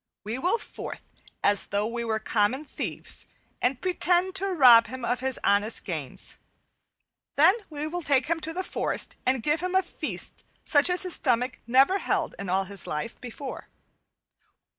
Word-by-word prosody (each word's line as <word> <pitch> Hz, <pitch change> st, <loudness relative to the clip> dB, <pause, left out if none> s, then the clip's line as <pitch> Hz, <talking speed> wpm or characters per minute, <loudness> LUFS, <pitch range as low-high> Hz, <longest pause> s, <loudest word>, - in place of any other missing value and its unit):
We 220 Hz, +5 st, -4 dB
will 365 Hz, -, +1 dB
forth -, -, -8 dB, 0.4 s
as 205 Hz, -1 st, +3 dB
though 205 Hz, +1 st, -1 dB
we 235 Hz, +1 st, -3 dB
were 225 Hz, -1 st, -1 dB
common 220 Hz, +6 st, 0 dB
thieves -, -, -3 dB, 0.3 s
and 250 Hz, +1 st, 0 dB
pretend 365 Hz, +2 st, +2 dB
to 390 Hz, +1 st, 0 dB
rob 250 Hz, -, +6 dB
him 255 Hz, +1 st, -6 dB
of 245 Hz, +1 st, -1 dB
his 260 Hz, 0 st, 0 dB
honest 205 Hz, +3 st, +2 dB
gains. 155 Hz, -9 st, -4 dB, 1.0 s
Then 320 Hz, +6 st, +6 dB, 0.2 s
will 300 Hz, -1 st, -5 dB
we 350 Hz, +2 st, -4 dB
take 280 Hz, -4 st, +2 dB
him 335 Hz, +2 st, 0 dB
into 325 Hz, 0 st, 0 dB
the 370 Hz, +3 st, -3 dB
forest -, -, -1 dB
and 255 Hz, -3 st, +1 dB
give 300 Hz, +1 st, +2 dB
him 365 Hz, +1 st, -3 dB
a 380 Hz, -, +4 dB
feast 350 Hz, -, -4 dB, 0.2 s
such 290 Hz, +3 st, +6 dB
as 360 Hz, +1 st, +4 dB
his 365 Hz, -2 st, +1 dB
stomach 250 Hz, -1 st, +1 dB
never 270 Hz, +11 st, +4 dB
held -, -, -1 dB
in 200 Hz, -2 st, -5 dB
all 190 Hz, +2 st, +1 dB
his 195 Hz, -2 st, -8 dB
life 150 Hz, +10 st, -5 dB
before. 255 Hz, +2 st, -8 dB
260 Hz, 170 wpm, -26 LUFS, 225-335 Hz, 1.0 s, rob